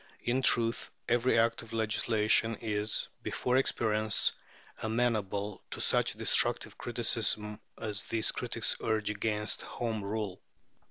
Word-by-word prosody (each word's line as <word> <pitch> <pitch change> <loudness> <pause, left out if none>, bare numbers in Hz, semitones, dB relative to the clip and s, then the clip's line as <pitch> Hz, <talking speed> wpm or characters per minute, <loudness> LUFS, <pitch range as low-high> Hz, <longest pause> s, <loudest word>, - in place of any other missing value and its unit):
In 125 +2 +1
truth, 115 -2 +1 0.2
every 120 +1 +3
act 115 0 +2
of 115 - -12
legislation 110 0 +2
is, 105 -1 -1
before 125 +1 0
experience, 110 -4 +2 0.5
amenable 105 -3 -1
to - - -7
such - - +2
destructive - - +2
criticism 105 0 -1 0.2
as 105 -2 -2
these 110 -1 +2
critics - - -1
urge 110 -2 0
against 105 0 -1
Home 110 -3 -3
Rule. 100 -2 -3
110 Hz, 115 wpm, -31 LUFS, 105-115 Hz, 0.5 s, every